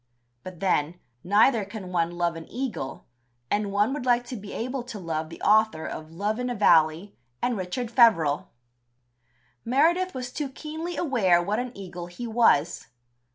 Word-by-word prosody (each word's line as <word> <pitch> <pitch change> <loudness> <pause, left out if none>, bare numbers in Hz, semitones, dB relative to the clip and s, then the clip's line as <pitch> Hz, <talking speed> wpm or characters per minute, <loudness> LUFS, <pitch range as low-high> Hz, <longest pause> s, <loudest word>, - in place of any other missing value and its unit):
But 180 +3 -10
then, 175 -3 0 0.2
neither 215 +4 +4
can 195 -2 -8
one 170 -2 +1
love 175 -1 -1
an 165 0 -10
eagle, 240 - -4 0.5
and 205 -1 0
one 205 +6 +2
would 290 - -4
like 245 -1 +3
to 255 - -4
be 205 -2 -8
able 255 +3 -3
to 240 -2 -8
love 160 -4 -3
the 165 - -10
author 215 -6 +3
of 155 0 -6
Love 205 +7 -2
in 250 0 -2
a 245 - -2
Valley 165 -1 +3 0.2
and 245 - 0
Richard 210 +5 -4
Feverel. 195 - +4 1.2
Meredith 335 +9 +2
was 250 -1 -5
too 295 -3 -3
keenly 315 +5 -6
aware 215 - +3
what 205 +6 -1
an 250 0 -3
eagle 180 -3 -7
he 175 +7 -7
was. 225 -9 +2
210 Hz, 165 wpm, -26 LUFS, 175-245 Hz, 1.2 s, neither